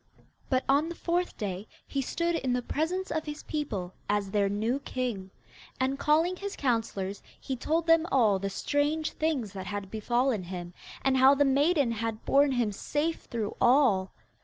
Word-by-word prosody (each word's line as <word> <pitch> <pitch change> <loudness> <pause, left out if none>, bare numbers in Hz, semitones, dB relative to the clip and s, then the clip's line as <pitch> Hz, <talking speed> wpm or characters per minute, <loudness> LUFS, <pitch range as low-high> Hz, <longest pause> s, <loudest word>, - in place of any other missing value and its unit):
But 260 -1 +2
on 285 +4 +3
the 340 - -6
fourth 350 +2 -1
day 200 0 -4 0.2
he 275 - -2
stood 335 +6 -1
in 260 -6 0
the 250 0 -1
presence 360 +8 -2
of 315 -1 -1
his 300 0 -6
people 205 - -3 0.2
as 205 -1 0
their 200 -1 +2
new 220 +6 0
king, 245 -8 -3 0.5
and, 265 +1 0
calling 320 +5 +3
his 400 +1 -5
councillors, 225 -6 -1 0.2
he 265 - -4
told 320 +6 0
them 330 0 +4
all 215 -7 +4
the 195 +1 -2
strange 295 +8 0
things 275 -11 -1
that 190 -1 -6
had 200 -2 -5
befallen 240 +1 +1
him, 175 -1 -6 0.3
and 265 0 +3
how 265 +2 +7
the 285 +1 +3
maiden 280 -1 +3
had 225 -1 -3
borne 280 0 +4
him 240 -4 +1
safe 295 +10 -2
through 225 -4 -3
all. 240 -8 +4
260 Hz, 175 wpm, -29 LUFS, 210-300 Hz, 0.5 s, how